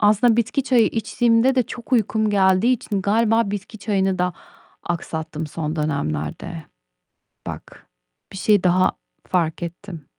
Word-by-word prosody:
Aslında 215 +2 +4
bitki 235 +4 +1
çayı 250 -4 +3
içtiğimde 230 +2 +2
de 255 - +3
çok 240 +2 -10
uykum 220 -2 +2
geldiği 190 +4 +3
için 205 -5 -2
galiba 225 +1 +2
bitki 205 +2 -6
çayını 195 -2 0
da 180 0 0 0.5
aksattım 160 -2 -4
son 155 +1 -4
dönemlerde. 140 - -3 0.8
Bak, - - -9 0.4
bir - - -8
şey 205 0 +3
daha 185 +1 +3 0.4
fark 170 -2 0
ettim. 170 -2 -8
200 Hz, 130 wpm, -22 LUFS, 170-225 Hz, 0.8 s, Aslında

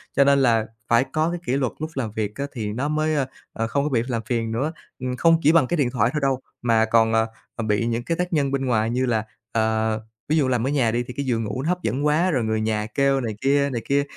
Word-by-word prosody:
cho 140 - +6
nên 140 0 +4
là 115 -4 +3 0.2
phải 120 +2 +4
có 155 +1 +2
cái 175 - -3
kỷ 125 - 0
luật 130 -3 0
lúc 155 +1 -3
làm 120 -6 -2
việc 105 -1 -3
á, 140 - -3
thì 105 -5 -3
nó 130 +6 -1
mới, 155 +1 0
à, 140 -3 +1 0.3
à, 115 - -2
không 140 +4 0
có 150 - 0
bị 120 -5 +2
làm 120 -3 -1
phiền 115 -1 -1
nữa. 135 +8 -1 0.3
Ừm, 130 -1 -3
không 165 +2 +5
chỉ 150 - +6
bằng 165 -5 +4
cái 175 - -1
điện 140 -5 +2
thoại 115 -2 +2
thôi 150 - 0
đâu 135 -2 +1 0.2
mà 115 -2 +3
còn, 110 0 +3
ờ, 110 0 +3 0.3
ờ, 115 - -3
bị 105 +1 +1
những 120 0 -1
cái 165 +6 -2
tác 180 0 -2
nhân 140 -3 +1
bên 135 -1 -1
ngoài 115 -3 +1
như 125 +2 0
là, 115 -4 +1 0.3
à, 110 0 +1 0.4
ví 155 - +3
dụ 145 -4 +3
làm 125 -1 +1
ở - - +1
nhà 135 -6 +2
đi 120 +2 0
thì 125 - -8
cái 140 - -2
giường 115 -3 0
ngủ 105 +4 -3
nó 160 - -1
hấp 180 0 -1
dẫn 130 +7 -1
quá, 160 +5 +3
rồi 130 -6 +1
người 110 0 0
nhà 110 -1 0
kêu 140 -1 +3
này 110 -4 -3
kia, 140 +1 +3
này 120 -4 -3
kia 140 +1 +3
125 Hz, 290 wpm, -23 LUFS, 115-140 Hz, 0.4 s, cho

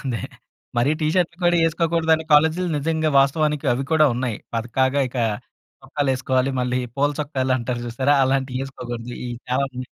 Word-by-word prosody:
అదే, 120 -6 -2 0.6
మరీ 135 +6 +3
టీ 155 - +2
షర్ట్‌‌లు 175 -1 0
కూడా 175 0 +4
యేసుకోకూడదు 165 0 +1
అనే 160 - -7
కాలేజ్‌‌లు 160 +4 +3
నిజంగా 155 +1 0
వాస్తవానికి 150 +1 +1
అవి 135 +2 -3
కూడా 155 -1 +5
ఉన్నాయి. 125 -3 -2 0.2
పక్కాగా 130 +4 +1
ఇక 125 - -5 0.6
చొక్కాలేసుకోవాలి 135 -1 0
మళ్ళీ 125 0 0 0.2
పూల 145 +1 +2
చొక్కాలంటారు 130 -4 -1
చూసారా? 130 +4 +1
అలాంటియి 130 -1 -1
యేసుకోకూడదు 120 -3 -7
ఇయి 120 - -4 0.2
చాలా 130 +2 +2
ఉన్నాయి. 125 0 -6
135 Hz, 150 wpm, -22 LUFS, 125-155 Hz, 0.6 s, కూడా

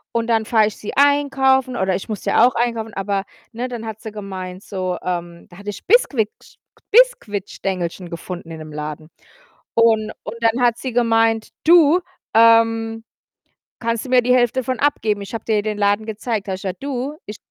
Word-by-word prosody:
und 230 0 0
dann 225 -2 +1
fahre 220 -2 +3
ich 215 - -6
sie 210 - -6
einkaufen 270 -2 +3
oder 190 -4 0
ich 195 - -5
muss 210 -4 -5
ja 235 - +5
auch 250 - +3
einkaufen, 230 -2 -1
aber, 195 0 -2 0.3
ne, 245 +2 -4
dann 240 -3 -6
hat 220 -1 -6
sie 220 - -7
gemeint, 190 -3 -7
so 185 -2 -3
ähm, 175 -1 -4
da 175 - -15
hatte 205 +1 -7
ich - - -12
Biskuicksch 275 - +1 0.4
Biskuitstängelchen 195 - +1
gefunden 170 0 -7
in 160 - -7
'nem 155 0 -9
Laden 150 +1 -6 0.7
und 220 -2 +3
und 230 - -6
dann 230 +2 +2
hat 240 -1 +3
sie 260 +1 -4
gemeint: 225 -2 +2 0.2
„Du, 335 +1 +6 0.3
ähm, 225 0 +4 0.8
kannst 230 0 -1
du - - -8
mir 250 -1 +5
die 250 +1 +3
Hälfte 250 +1 +2
von 255 0 -2
abgeben? 220 -8 +1
Ich 200 +3 -9
habe 225 - -5
dir 220 -1 +1
ja 205 - +1
den 215 -1 -3
Laden 205 +1 +1
gezeigt.“ 215 -1 -3
Da - - -1
habe 185 - -2
ich - - -13
gesagt: 190 +2 -5
„Du, 275 +1 -3
ich“ 210 - -7
225 Hz, 195 wpm, -20 LUFS, 195-245 Hz, 0.8 s, Du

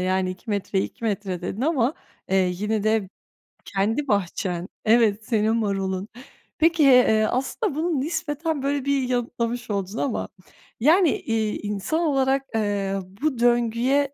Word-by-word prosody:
"Yani 185 0 0
2 185 +5 -8
metreye 200 -1 0
2 - - -9
metre" 200 -4 -2
dedin 205 - -4
ama, 275 -2 +1 0.3
eee, 190 - +2 0.2
yine 210 +3 -1
de 215 -3 +1 0.6
kendi 220 +9 -1
bahçen 180 -4 -1 0.2
Evet, 220 -2 +3
senin 220 -1 +1
marulun. 195 -3 -1 0.5
Peki, 325 0 +3
eee, 250 -5 +6
aslında 270 - -1
bunu 320 -1 0
nispeten 310 -1 -2
böyle 280 -1 -1
bir 275 -2 +1
yanıtlamış 240 -1 -2
oldun 200 +1 -3
ama 265 -2 -2 0.5
yani, 320 - +5
iii, 220 -2 -2
insan 210 +9 -2
olarak, 270 -4 +2
eee, 200 -2 0 0.2
bu 295 -5 0
döngüye 240 +4 +2
230 Hz, 135 wpm, -24 LUFS, 205-275 Hz, 0.6 s, eee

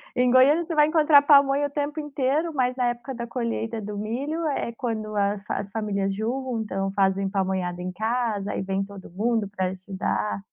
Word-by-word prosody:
Em 250 0 +3
Goiânia 280 +6 +5
você 330 - -5
vai 300 -1 +5
encontrar 310 -2 +6
pamonha 280 0 +5
o - - -12
tempo 290 +2 -3
inteiro, 295 +3 -1
mas 255 -2 +1
na 250 - +1
época 240 +2 -3
da 235 -1 -5
colheita 230 -2 -3
do 205 0 -6
milho 275 +10 -3
é 275 -5 -2
quando 220 -3 -3
a 200 0 +2
f 200 - -9
as 200 0 -2
famílias 200 -3 -1
juntam, 220 -4 -2
fazem 195 0 +1
pamonhada 185 -2 -1
em 180 0 -4
casa, 220 -1 -1
aí - - -2
vem 195 0 -1
todo 195 -3 -11
mundo 220 +3 0
pra 190 -2 -2
ajudar. 190 +2 -2
230 Hz, 190 wpm, -25 LUFS, 200-275 Hz, -, encontrar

